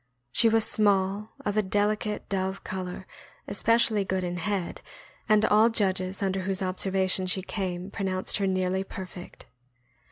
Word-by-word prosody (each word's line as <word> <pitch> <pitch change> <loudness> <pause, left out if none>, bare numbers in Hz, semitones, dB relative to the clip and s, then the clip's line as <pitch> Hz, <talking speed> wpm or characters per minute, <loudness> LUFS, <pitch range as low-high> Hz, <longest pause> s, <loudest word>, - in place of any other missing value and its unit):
She 225 - +5
was 225 0 +3
small, 200 0 +1
of 205 +1 -1
a - - +5
delicate 210 +1 -1
dove 190 0 -2
color, 185 0 -5 0.4
especially 220 +1 +3
good 190 -1 -2
in 175 0 -3
head, 190 0 -2 0.5
and 215 0 +5
all 215 +2 +5
judges 190 -3 -1
under 195 0 0
whose 190 0 -2
observation 185 0 +1
she 185 +1 +2
came 185 -2 -4
pronounced 190 -2 -2
her 200 -1 0
nearly 185 0 0
perfect. 185 -2 -9
190 Hz, 140 wpm, -27 LUFS, 185-205 Hz, 0.5 s, She